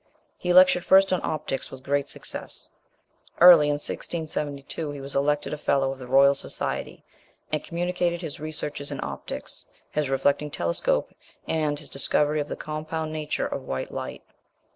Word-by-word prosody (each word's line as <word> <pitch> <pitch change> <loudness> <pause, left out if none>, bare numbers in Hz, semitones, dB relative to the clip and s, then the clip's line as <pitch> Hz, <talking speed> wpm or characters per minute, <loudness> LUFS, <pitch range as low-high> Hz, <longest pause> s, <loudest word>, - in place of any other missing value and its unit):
He 180 - 0
lectured 180 -1 +6
first 195 0 +5
on 185 - +1
optics 150 -4 -3
with 130 -1 -10
great 140 +1 0
success. - - -7 0.7
Early 170 -4 +9
in 145 - +2
1672 150 0 -4
he 145 -1 -6
was 140 0 -3
elected 145 +2 +1
a 150 - -4
Fellow 135 -2 +1
of 135 - -7
the 125 - -8
Royal 135 +2 +6
Society, 140 - -4 0.5
and 155 -1 -1
communicated 175 0 -1
his 155 -4 -5
researches 150 -2 -4
in 140 - -4
optics, 70 -1 -5 0.2
his 150 -2 -1
reflecting 140 +2 +1
telescope, 85 -11 0 0.3
and 155 -2 0
his 150 -1 -7
discovery 150 +2 +1
of 145 - -4
the - - -4
compound 155 +1 -4
nature 155 -1 -2
of - - -3
white 65 0 -3
light. - - -6
150 Hz, 160 wpm, -26 LUFS, 140-160 Hz, 0.7 s, Early